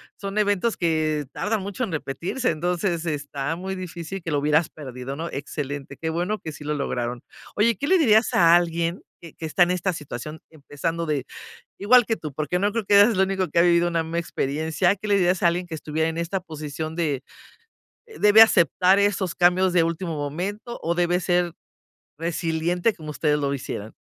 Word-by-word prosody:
son 200 +1 -6
eventos 205 +2 +1
que 155 -3 0
tardan 210 0 -2
mucho 200 +6 -4
en 215 - -3
repetirse, 165 - -2
entonces 175 +1 -1
está 145 0 -3
muy 190 +2 -5
difícil 180 0 -6
que 165 - -5
lo 145 - +1
hubieras 150 +2 +2
perdido, 130 -2 -7
¿no?, 165 +3 -4
excelente, 140 -1 -5
qué 160 - -3
bueno 180 +6 -1
que 160 - -7
sí 150 0 -11
lo 150 - -1
lograron. 125 -4 -3 0.3
Oye, 225 +2 +2
¿qué 285 - -3
le 375 - +5
dirías 220 -7 +4
a 170 -1 +6
alguien 170 0 +2 0.2
que 165 -3 -11
que 160 - -6
está 175 +3 +4
en 175 - +1
esta 180 +1 0
situación 150 -1 -7
empezando 160 +2 -4
de 145 -4 -1 0.5
igual 240 +4 +5
que 225 - 0
tú? 155 - -6
Porque 155 +5 -2
no 205 +1 +1
creo 225 -2 -2
que 205 - +1
eres 205 +3 +8
el - - -1
único 190 -1 0
que 170 - -4
ha - - +7
vivido 175 0 +4
una 170 -1 0
misma 165 +1 -2
experiencia, 160 +3 0
¿qué 210 - -7
le 205 - +3
dirías 180 -1 +2
a 175 - +5
alguien 175 +2 0
que 170 - -9
estuviera 160 +1 -1
en 165 - -4
esta 175 +3 -2
posición 155 0 -6
de 150 -6 -1 0.8
debe 220 - +5
aceptar 190 -2 +5
esos 200 -3 +1
cambios 180 +1 +3
de 170 - +5
último 165 0 -2
momento 190 +11 -4
o 170 - 0
debe 175 +1 +1
ser 175 -1 +1 0.7
resiliente 170 +4 0
como 155 -4 -10
ustedes 150 -1 +1
lo 140 -1 -1
hicieron? 110 -5 -6
170 Hz, 195 wpm, -24 LUFS, 155-190 Hz, 0.8 s, eres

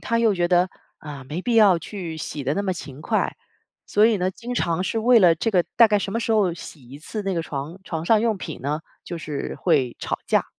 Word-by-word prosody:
他 230 0 0
又 225 -3 +3
觉 175 -1 +1
得， 180 +1 +3 0.3
啊， 145 -3 -9
没 155 +6 -5
必 235 +3 -1
要 200 -6 +6
去 175 -4 -6
洗 145 -2 -5
得 140 - 0
那 200 - -1
么 190 - 0
勤 145 -5 -9
快。 - - 0 0.5
所 210 +1 +3
以 220 -4 +2
呢， 185 +1 0
经 245 +5 -7
常 170 -3 0
是 225 - -1
为 235 +1 +5
了 175 -4 +6
这 225 +8 -1
个， 180 -4 +3
大 230 -2 +7
概 210 -1 +3
什 195 - -4
么 230 - -1
时 230 - -2
候 200 -5 +3
洗 150 -5 -11
一 140 - -9
次 210 +7 -5
那 195 -1 -1
个 165 - 0
床 155 +5 -6
床 160 -1 -4
上 220 +2 +4
用 225 -3 +1
品 160 -4 -7
呢， 150 +4 -2 0.2
就 175 - -6
是 150 -3 -5
会 140 -9 +2
吵 - - -3
架。 - - +2
180 Hz, 265 characters per minute, -23 LUFS, 155-215 Hz, 0.5 s, 大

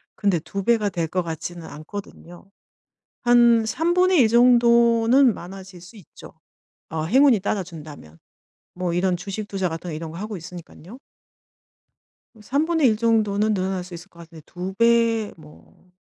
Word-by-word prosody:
근데 195 -5 0
2 195 +4 -6
배가 220 -3 +1
될 170 -3 -3
것 180 +2 -2
같지는 165 +1 -7
않거든요. 175 +3 -11 0.7
한 240 -2 +4
1/3 345 -1 +2
정도는 235 +1 +4
많아질 185 0 -11
수 180 +6 -15
있죠, 195 - -15 0.6
어 160 0 -3
행운이 255 - +4
따라준다면. 155 - -6 0.6
뭐 180 -1 -3
이런 180 0 0
주식 200 +3 -6
투자 190 -2 -2
같은 165 +2 -7
거 - - -5
이런 160 0 -6
거 165 - -9
하고 210 0 -6
있으니깐요. 175 +4 -12 1.4
1/3 285 -1 +1
정도는 215 -2 +1
늘어날 190 -1 -2
수 180 0 -12
있을 175 +3 -10
것 170 - -21
같은데 165 -1 -13
2 180 +2 -7
배 230 -1 +2
뭐 155 +3 -19
195 Hz, 250 characters per minute, -22 LUFS, 175-230 Hz, 1.4 s, 한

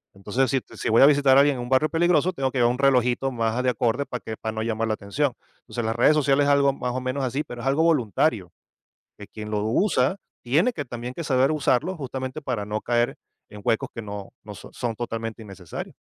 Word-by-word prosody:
Entonces 120 +6 -1
si 135 -1 +1
t - - -16
si - - -2
voy 110 - +5
a - - +10
visitar 140 -2 +5
a - - +8
alguien 140 -2 +2
en - - -4
un 120 - -7
barrio 135 +4 +3
peligroso, 175 +2 +2
tengo 135 -4 -1
que 130 - -2
llevar 120 0 +4
un 125 - -3
relojito 130 -1 +2
más 115 -2 -1
a 125 - 0
de 130 - +1
acorde 120 +3 0
para 125 - -6
que 110 -1 -7
para 110 0 -4
no 110 - -3
llamar 115 0 -1
la 110 - 0
atención. 125 +7 -1 0.3
Entonces 120 -2 -5
las 115 +1 -1
redes 125 +6 +4
sociales 145 -1 +3
es - - +2
algo 140 -1 +4
más 125 -2 -3
o 130 - -2
menos 130 +2 -2
así, 135 +4 -1
pero 120 -1 -9
es 135 - -4
algo 145 +4 +2
voluntario 125 - +1 0.7
que - - -10
quien 105 0 -8
lo 105 -1 -1
usa 195 - +1 0.3
tiene 160 - +2
que 145 -7 -5
también 120 +1 -6
que 170 - -5
saber 135 0 +2
usarlo 155 +3 +1
justamente 130 0 -5
para 120 -7 -3
no 105 +1 -3
caer 120 +3 0 0.3
en 105 -1 -11
huecos 115 - 0
que 115 - -6
no 105 -2 -7
no - - -9
so - - -12
son 115 -2 -3
totalmente 115 -1 -5
innecesarios. 95 -5 -8
125 Hz, 245 wpm, -24 LUFS, 115-140 Hz, 0.7 s, a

